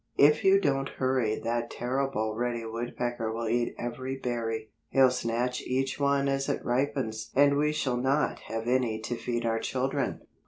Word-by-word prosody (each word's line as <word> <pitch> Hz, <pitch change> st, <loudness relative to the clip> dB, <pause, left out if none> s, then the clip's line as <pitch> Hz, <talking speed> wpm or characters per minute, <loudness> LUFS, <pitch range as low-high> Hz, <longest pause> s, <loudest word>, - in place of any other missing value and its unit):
"If 150 Hz, +1 st, +5 dB
you 195 Hz, +1 st, +6 dB
don't 135 Hz, -6 st, 0 dB
hurry 130 Hz, -4 st, +1 dB
that 120 Hz, +1 st, -1 dB
terrible 125 Hz, -3 st, -1 dB
Reddy 120 Hz, 0 st, -2 dB
Woodpecker 120 Hz, 0 st, -3 dB
will 115 Hz, +1 st, -3 dB
eat 120 Hz, +1 st, 0 dB
every 130 Hz, +2 st, -4 dB
berry. 115 Hz, -4 st, -3 dB, 0.2 s
He'll 130 Hz, -1 st, +5 dB
snatch 125 Hz, 0 st, -1 dB
each 130 Hz, +2 st, -1 dB
one 140 Hz, 0 st, +2 dB
as 135 Hz, 0 st, 0 dB
it -, -, -2 dB
ripens 125 Hz, -3 st, -1 dB
and 140 Hz, +1 st, +5 dB
we 150 Hz, +1 st, +2 dB
shall 130 Hz, -5 st, -1 dB
not 135 Hz, +4 st, +1 dB
have 115 Hz, +1 st, -4 dB
any 120 Hz, -3 st, +1 dB
to 120 Hz, +2 st, -3 dB
feed 120 Hz, 0 st, -2 dB
our 115 Hz, 0 st, +1 dB
children." 135 Hz, +3 st, -1 dB
125 Hz, 165 wpm, -29 LUFS, 115-135 Hz, 0.2 s, you